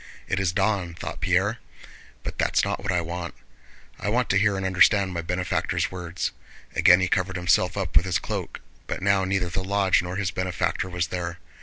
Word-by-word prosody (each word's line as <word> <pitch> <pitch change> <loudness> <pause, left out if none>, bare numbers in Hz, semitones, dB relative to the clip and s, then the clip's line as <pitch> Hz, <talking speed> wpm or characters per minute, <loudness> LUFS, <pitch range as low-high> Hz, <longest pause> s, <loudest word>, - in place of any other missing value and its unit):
"It 100 - 0
is 95 -4 +1
dawn," 95 -3 0
thought - - -6
Pierre. - - +1 0.6
"But - - -6
that's - - +2
not - - -2
what 100 0 -1
I 90 -1 +1
want. 85 +1 -5 0.6
I 100 - -2
want 120 +3 +1
to 100 - +4
hear 105 -1 +2
and 95 - -3
understand 95 +1 +4
my 85 - -2
benefactor's 90 +2 -1
words." 90 -1 -3 0.4
Again 90 0 +6
he 90 - +2
covered 95 0 0
himself 90 +1 +2
up 95 -4 -3
with 85 - +5
his 90 - +2
cloak, - - -5 0.3
but - - -4
now 100 -1 +3
neither 95 -2 0
the 95 +1 -2
lodge 100 -1 +2
nor 90 +1 -5
his 95 -1 -1
benefactor 95 0 -1
was 90 -2 -2
there. 85 -2 -4
95 Hz, 195 wpm, -25 LUFS, 90-95 Hz, 0.6 s, Again